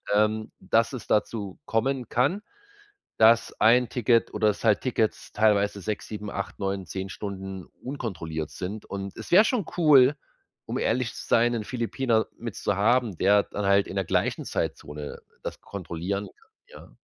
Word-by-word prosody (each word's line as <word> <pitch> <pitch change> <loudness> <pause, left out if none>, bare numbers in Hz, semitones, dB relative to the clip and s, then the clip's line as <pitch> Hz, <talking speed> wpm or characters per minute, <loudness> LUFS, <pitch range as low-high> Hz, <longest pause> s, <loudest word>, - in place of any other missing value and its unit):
ähm, 110 +1 +1
dass 115 +6 +1
es 130 - -6
dazu 105 -2 -1
kommen 125 +2 0
kann, 140 - +1 0.8
dass 115 +1 +5
ein 120 +2 +5
Ticket 120 -1 +2
oder, 105 0 +2
dass 105 - -3
halt 110 -3 +3
Tickets 115 -4 -1
teilweise 105 -1 +2
6, 105 +2 -4
7, 105 -1 -6
8, 100 - -5
9, 95 -1 -2
10 95 +1 -5
Stunden 95 -1 -6 0.2
unkontrolliert 85 - -4
sind 100 +4 -6
und 100 -1 -6
es - - -9
wär 185 +5 +8
schon 230 -7 0
cool, 145 -4 +6 0.5
um - - -3
ehrlich 115 0 0
zu - - -8
sein, 120 +1 +4
'nen 115 -2 -2
Philippiner 120 -1 0
mitzuhaben, 115 -1 0
der 100 +3 +4
dann 105 - -4
halt 100 0 +4
in - - -7
der 95 -1 0
gleichen - - 0
Zeitzone 75 0 -4 0.2
das - - -6
kontrollieren 95 +2 -4
kann, 455 - -22 0.4
ja. - - -23
105 Hz, 160 wpm, -26 LUFS, 100-120 Hz, 0.8 s, wär